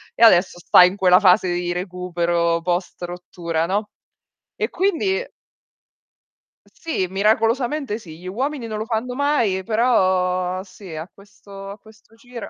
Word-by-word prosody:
E 230 - +2
adesso 180 -5 +5
sta 175 - +6
in 180 +2 +3
quella 185 -2 +5
fase 185 -1 +4
di 175 0 -2
recupero 175 -2 -1
post 175 +2 -3
rottura, 175 -2 -4
no, 205 +4 -2 0.7
e - - -1
quindi 385 +4 0 1.4
Sì, 315 - -4
miracolosamente 225 +6 0
sì, 165 -7 -12
gli 180 - -10
uomini 255 +5 -3
non 215 -1 -4
lo 215 - -4
fanno 235 +2 -3
mai, 245 -10 +1
però 185 -5 +1
sì 190 -2 -12
a 155 +2 -6
questo 200 -1 -13
a 200 - -10
questo 220 +1 -21
giro 235 0 -10
195 Hz, 140 wpm, -21 LUFS, 180-225 Hz, 1.4 s, sta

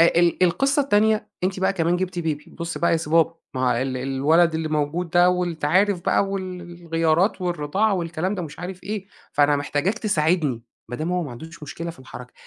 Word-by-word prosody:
آآ 165 - +8
ال 175 +1 +2
القِصّة 275 - +3
التانية 215 -3 +2 0.2
أنتِ 185 0 -1
بقى 190 +1 +2
كمان 170 -2 +1
جِبتِ 185 0 -3
baby 155 -3 -3
بُص 170 -1 -5
بقى 170 - +2
يا - - +4
سي 160 -2 -5
بابا 165 0 +4 0.2
ما 130 - -2
هو 125 -1 +3
ال 130 -1 -2
الولد 145 +6 +2
اللي 160 0 -1
موجود 155 +3 -1
ده 175 +1 +5
وأنت 175 -4 -2
عارف 190 +4 +3
بقى - - +3
وال 185 -2 -4 0.2
الغيارات 165 +4 +1
والرِضاعة 180 +4 0
والكلام 175 +2 -2
ده 185 - -4
ومش 155 -3 -8
عارف 180 +1 -7
إيه، 205 -1 -4 0.3
فأنا 145 0 +4
محتاجاك 145 +9 -1
تساعدني. 155 - +1 0.3
ما 120 - -5
دام 160 +5 -2
هو 180 0 0
ما 145 - -6
عندوش 160 +7 -10
مشكلة 165 +3 -5
في 165 - -14
الحركة 125 -1 -11
170 Hz, 205 wpm, -23 LUFS, 150-185 Hz, 0.3 s, آآ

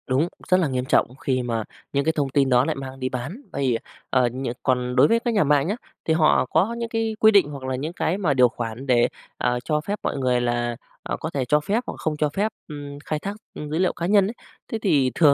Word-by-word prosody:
Đúng, 135 +6 +2 0.2
rất 185 - +6
là 175 - +2
nghiêm 130 -2 -2
trọng 125 -1 +2
khi 130 -1 -1
mà 115 -2 -1 0.3
những 140 0 +2
cái 160 - +3
thông 140 -3 0
tin 135 0 +2
đó 125 0 +4
lại 160 - -1
mang 135 -1 -7
đi 130 0 -1
bán, 130 - -5
vây, 130 -4 +1 0.3
ờ, 130 - +3
ờ, 120 - +3
nh 130 +3 -5 0.2
còn 125 -1 0
đối 130 - +6
với 230 0 +3
các 235 0 -1
nhà 205 - +4
mạng 145 0 +3
nhá, 205 - 0 0.3
thì 160 - +2
họ 160 -4 +4
có 190 - +1
những 235 0 -3
cái 225 -1 -1
quy 220 - +7
định 200 -7 +5
hoặc 140 -2 -8
là 130 0 -2
những 150 +6 -4
cái 175 0 0
mà 175 -8 +1
điều 125 -2 +5
khoản 115 +3 -5
để, 120 -2 +4 0.3
à, 125 0 +1
cho 150 -1 0
phép 205 +6 -3
mọi - - -1
người 125 -2 +1
là, 120 0 0 0.3
à, - - -2
có 160 - -3
thể 140 -5 -2
cho 150 +5 +3
phép 210 +10 -1
hoặc - - -3
không 155 -1 -2
cho 150 0 +1
phép, 200 +8 0 0.2
ưm, 145 -2 -7
khai 155 - -2
thác, 200 +5 -4 0.2
ừm, 150 - -6
dữ 155 - -1
liệu 185 -1 +2
cá 170 - -4
nhân 200 +1 +4
ấy. 220 - -4 0.4
Thế 225 - 0
thì 145 -11 +3
thường 150 -4 +6
145 Hz, 270 wpm, -24 LUFS, 130-175 Hz, 0.4 s, quy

